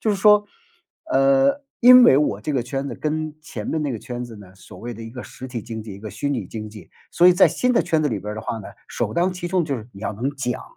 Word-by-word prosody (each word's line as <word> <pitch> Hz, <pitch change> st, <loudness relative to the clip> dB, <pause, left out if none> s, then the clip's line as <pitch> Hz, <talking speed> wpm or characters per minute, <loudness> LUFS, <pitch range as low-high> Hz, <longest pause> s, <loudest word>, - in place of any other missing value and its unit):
就 220 Hz, -, -1 dB
是 205 Hz, -, +2 dB
说， 210 Hz, +1 st, +5 dB, 0.7 s
呃， 275 Hz, 0 st, +3 dB, 0.2 s
因 250 Hz, 0 st, +9 dB
为 130 Hz, -, +7 dB
我 125 Hz, -9 st, +1 dB
这 150 Hz, +5 st, -3 dB
个 125 Hz, -, +1 dB
圈 135 Hz, +3 st, -4 dB
子 -, -, -5 dB
跟 155 Hz, 0 st, -3 dB
前 -, -, -7 dB
面 160 Hz, -, -1 dB
那 145 Hz, -3 st, -2 dB
个 115 Hz, -, -4 dB
圈 125 Hz, 0 st, -6 dB
子 115 Hz, -2 st, -10 dB
呢， 95 Hz, -2 st, -14 dB
所 95 Hz, -, -14 dB
谓 120 Hz, +1 st, -6 dB
的 115 Hz, -, -9 dB
一 115 Hz, -, -8 dB
个 125 Hz, 0 st, -8 dB
实 130 Hz, -, -10 dB
体 125 Hz, -3 st, -5 dB
经 110 Hz, 0 st, -7 dB
济， 105 Hz, -2 st, -9 dB
一 100 Hz, -, -11 dB
个 110 Hz, +1 st, -8 dB
虚 140 Hz, +9 st, -3 dB
拟 115 Hz, -9 st, -2 dB
经 110 Hz, 0 st, -7 dB
济。 105 Hz, -4 st, -13 dB, 0.2 s
所 175 Hz, +1 st, +5 dB
以 180 Hz, -, +5 dB
在 190 Hz, -, +6 dB
新 250 Hz, 0 st, 0 dB
的 -, -, +4 dB
圈 160 Hz, -3 st, +1 dB
子 150 Hz, -, +1 dB
里 110 Hz, -5 st, -2 dB
边 105 Hz, +3 st, -6 dB
儿 -, -, -6 dB
的 110 Hz, -, -5 dB
话 115 Hz, -, -4 dB
呢， 105 Hz, -, -8 dB, 0.2 s
首 -, -, -2 dB
当 175 Hz, +2 st, +1 dB
其 180 Hz, -1 st, -6 dB
冲 180 Hz, 0 st, +1 dB
就 145 Hz, -4 st, -2 dB
是 110 Hz, -1 st, -9 dB
你 100 Hz, -, -13 dB
要 110 Hz, -, -3 dB
能 125 Hz, +7 st, -2 dB
讲， 135 Hz, -3 st, -4 dB
135 Hz, 320 characters per minute, -22 LUFS, 110-175 Hz, 0.7 s, 因